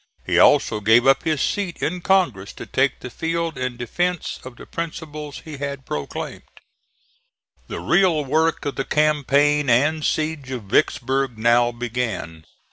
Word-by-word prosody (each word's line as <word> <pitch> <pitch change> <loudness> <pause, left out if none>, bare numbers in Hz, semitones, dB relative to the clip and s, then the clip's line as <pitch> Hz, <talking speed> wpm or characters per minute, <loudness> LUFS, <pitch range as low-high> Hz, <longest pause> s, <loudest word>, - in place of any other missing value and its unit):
He - - +2
also 105 - +4
gave 110 +4 +4
up 135 0 +4
his 155 -4 0
seat 195 -4 -2
in 180 +3 -2
Congress 155 - +1
to - - -9
take 135 +1 0
the 125 - -7
field 165 +3 -2
in 125 -1 -3
defence 175 +8 -2
of 130 -1 -10
the - - -12
principles 155 -3 -6
he 155 -3 -8
had 140 -1 -5
proclaimed. 150 - -5 1.3
The - - -5
real 170 -6 +3
work 160 +4 +1
of 145 - -3
the 135 - 0
campaign 145 -1 +2
and 150 +6 +3
siege 155 -4 -1
of 125 -4 -5
Vicksburg 130 +3 0
now 120 +2 +3
began. 115 -9 -4
140 Hz, 150 wpm, -22 LUFS, 120-160 Hz, 1.3 s, also